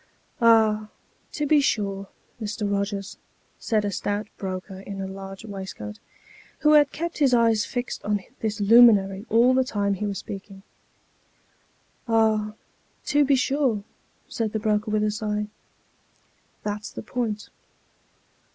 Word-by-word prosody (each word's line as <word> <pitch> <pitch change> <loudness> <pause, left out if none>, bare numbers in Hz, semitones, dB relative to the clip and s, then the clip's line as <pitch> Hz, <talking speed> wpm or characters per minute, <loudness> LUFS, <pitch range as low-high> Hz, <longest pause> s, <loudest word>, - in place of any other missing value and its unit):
" - - -34
Ah, 215 -1 +3 0.4
to 300 - -2
be 295 0 +4
sure, 200 -6 -1 0.3
Mr. 210 0 -2
Kogers," 200 0 -2 0.4
said 215 -3 0
a 205 - -1
stout 205 +2 -2
broker 190 0 -6
in 195 0 -7
a 195 - -3
large 195 +1 -8
waist 195 -3 -7
coat, 105 0 -8 0.6
who 300 - +5
had 295 -2 +6
kept 335 +1 -4
his 270 -4 +4
eyes 230 -3 +3
fixed 245 0 -4
on 205 0 0 0.2
this 215 -1 -2
luminary 205 -2 +5
all 235 +3 +5
the 260 0 +3
time 205 -5 -1
he 205 +2 -2
was 200 -1 -3
speaking. 195 0 -8 0.8
" - - -39
Ah, 220 -2 +2 0.5
to 290 0 +3
be 280 0 +4
sure," 260 -5 +1 0.4
said 220 -2 -3
the 220 - 0
broker 210 0 0
with 215 0 +1
a 215 - +1
sigh, 210 -1 -2 0.6
" - - -39
that's 210 +1 -4
the - - -8
point." 220 -4 -3
210 Hz, 150 wpm, -25 LUFS, 200-230 Hz, 0.8 s, had